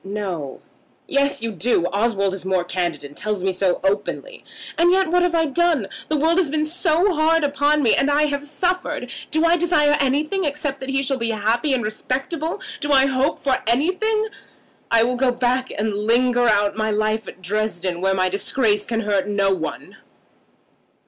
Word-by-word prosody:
"No." 190 -9 -5 0.5
"Yes, 280 -4 0
you 230 - -2
do. 200 -2 +1
Oswald 200 -2 +1
is 195 - -5
more 185 -1 0
candid, 175 -4 -3
and 145 0 -10
tells 210 -3 -3
me 190 - +1
so 185 -1 0
openly. 205 - -2 0.3
And 345 +1 +4
yet 380 -2 +2
what 355 0 +3
have 355 -1 +1
I 325 -1 +3
done? 310 - +1 0.2
The 310 - 0
world 325 +5 +2
has 345 -6 +1
been 305 +1 0
hard 330 -1 +2
upon 290 +1 +1
me, 230 - +4
and 275 - +2
I 290 +1 +3
have 285 -1 -1
suffered. 330 -4 -2 0.2
Do 315 +1 +1
I 335 +1 +4
desire 305 -4 +3
anything 300 +8 0
except 290 -2 -2
that 265 - -7
he 270 0 0
shall 270 0 0
be 230 0 -1
happy 225 +6 0
and 255 -3 0
respectable? 270 - -3 0.2
Do 290 - -2
I 270 -1 +5
hope 270 +2 0
for 265 -2 0
anything? 370 - +1 0.6
I 230 -1 +4
will 250 +1 0
go 260 0 +2
back 250 +1 0
and 210 +1 -2
linger 240 +4 +2
out 205 -2 +2
my 220 0 -1
life 215 0 -1
at - - -10
Dresden, 185 -3 -2
where 190 0 +1
my 185 -1 +1
disgrace 205 +2 0
can 225 -1 -1
hurt 200 -2 0
no 200 -1 +1
one." - - -6
255 Hz, 185 wpm, -21 LUFS, 205-300 Hz, 0.6 s, I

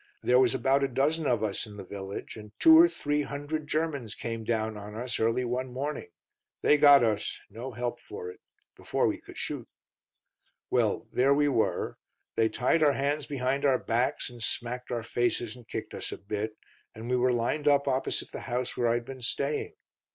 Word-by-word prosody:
There 125 +1 +5
was 130 0 +4
about 135 +2 +2
a - - +3
dozen 145 +4 +1
of 115 -3 +1
us 105 0 -2
in 105 -1 -11
the 100 - -7
village, 95 +1 -7
and 105 -1 -11
two 320 0 +8
or 335 +2 +8
three 150 - -1
hundred 145 +2 -4
Germans 150 -8 -2
came 115 -1 -4
down 110 -1 -1
on 105 +1 -8
us 120 +2 -3
early 115 +3 +1
one 125 +1 -2
morning. 145 - -4 0.6
They 150 - +6
got 145 -3 +8
us; 105 -3 0
no 120 +5 -7
help 120 +1 -3
for 90 -3 -7
'it. - - -16 0.4
Before - - 0
we - - 0
could - - -13
shoot. - - -4 1.0
"Well - - +1
there 135 +3 +4
we 145 0 +3
were. 120 -5 0 0.4
They 110 0 +3
tied 125 +8 +1
our 145 -2 +5
hands 145 +2 -1
behind 135 0 -1
our 135 -3 +4
backs, 120 +2 0
and 120 -2 -10
smacked 125 +2 -2
our 120 -2 -2
faces 120 -1 -1
and 120 -3 -15
kicked - - -5
us - - -4
a - - -5
bit, 105 +2 -4 0.4
and 110 +2 -7
we 125 - +1
were 125 0 +3
lined 120 +6 0
up 140 -1 +4
opposite 130 -1 -1
the - - -6
house 125 +1 -1
where 120 - +1
I'd 120 0 +1
been 130 0 -8
staying. 140 +5 -2
125 Hz, 195 wpm, -29 LUFS, 115-140 Hz, 1.0 s, two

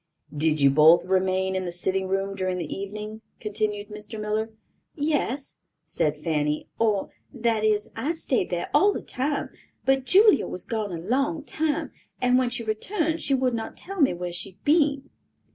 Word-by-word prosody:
"Did 155 +1 +2
you 140 -1 +5
both 155 +5 +6
remain 190 0 +1
in 185 0 -1
the 175 - -3
sitting 190 +2 -1
room 195 +1 -1
during 185 -1 -1
the 165 -4 -4
evening?" 210 +2 -6 0.2
continued 210 -1 -2
Mr. 210 +1 -7
Miller. 215 +1 -1 0.5
"Yes," 290 -3 -1 0.3
said 155 -2 -1
Fanny, 150 -1 -1
"or, 215 -4 +1 0.2
that 230 -4 0
is, 210 -1 +1
I 280 +9 -1
stayed 265 - -1
there 175 -1 -3
all 405 +1 +5
the - - -5
time; 280 +3 -2 0.3
but 270 -1 +2
Julia 410 +7 +5
was 180 - -6
gone 215 -3 -2
a 170 - -3
long 275 - 0
time, 310 -1 -1 0.3
and 250 0 +4
when 255 -1 +1
she 240 -1 -3
returned 320 - -1
she 275 0 +1
would 255 -1 +1
not 225 -1 -4
tell 390 -2 -4
me 275 - +5
where 175 0 -5
she 185 +2 -5
had 195 - -37
been." 285 -3 +2
215 Hz, 180 wpm, -25 LUFS, 185-270 Hz, 0.5 s, both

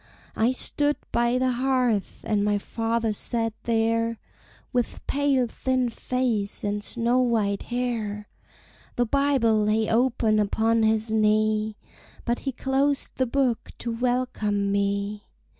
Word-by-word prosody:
I 225 +3 +2
stood 290 +3 +2 0.2
by 240 +1 +2
the 255 0 +1
hearth, 250 -4 0
and 210 -2 0
my 205 0 +2
father 225 +1 -1
sat 225 +1 -2
there, 230 0 +1 0.6
With 245 -2 -2
pale, 275 -3 +2
thin 255 +1 -1
face, 230 -4 -2
and 205 0 -2
snow 240 +3 +1
white 220 -5 +1
hair! 225 -4 -3 0.7
The 245 - +2
Bible 260 -4 +2
lay 215 +1 +1
open 230 -2 +2
upon 225 +2 +2
his 220 0 +1
knee, 215 0 +2 0.5
But 240 0 0
he - - -1
closed 270 +2 0
the 260 - +1
book 255 -2 0
to 235 - -4
welcome 230 -4 0
me. 200 +1 -1
230 Hz, 125 wpm, -25 LUFS, 215-250 Hz, 0.7 s, I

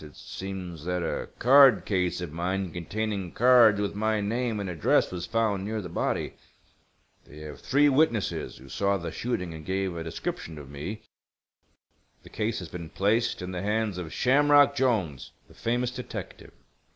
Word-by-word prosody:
It 75 -1 -12
seems 90 -4 -7
that 90 -1 -1
a - - -3
card 135 -3 +6
case 90 -3 0
of 85 -4 -6
mine 90 +2 -2
containing 100 +1 -3
cards 120 -4 +6
with 100 -1 -1
my 110 +1 0
name 115 +2 -1
and 100 - -3
address 85 -4 +2
was 90 -1 -5
found 110 -4 0
near 110 +2 -3
the 90 -4 -6
body. - - -2 0.9
They 75 - -14
have 75 -1 -9
three 145 +2 +3
witnesses 135 -7 +1
who 65 - -14
saw 100 +7 0
the 85 -2 -5
shooting 90 -8 -3
and 80 -1 -9
gave 95 0 -2
a 85 - -4
description 80 0 -5
of 70 -2 -10
me. 90 +10 -6 1.2
The - - -14
case 110 +1 -2
has 90 - -6
been 85 -2 -7
placed 105 +3 0
in 90 - -5
the 90 -1 -4
hands 105 -2 -1
of 80 -3 -6
Shamrock 145 +2 +4
Jolnes, 110 - 0 0.2
the - - -18
famous 120 +1 -1
detective. 125 0 -8
100 Hz, 170 wpm, -27 LUFS, 85-115 Hz, 1.2 s, card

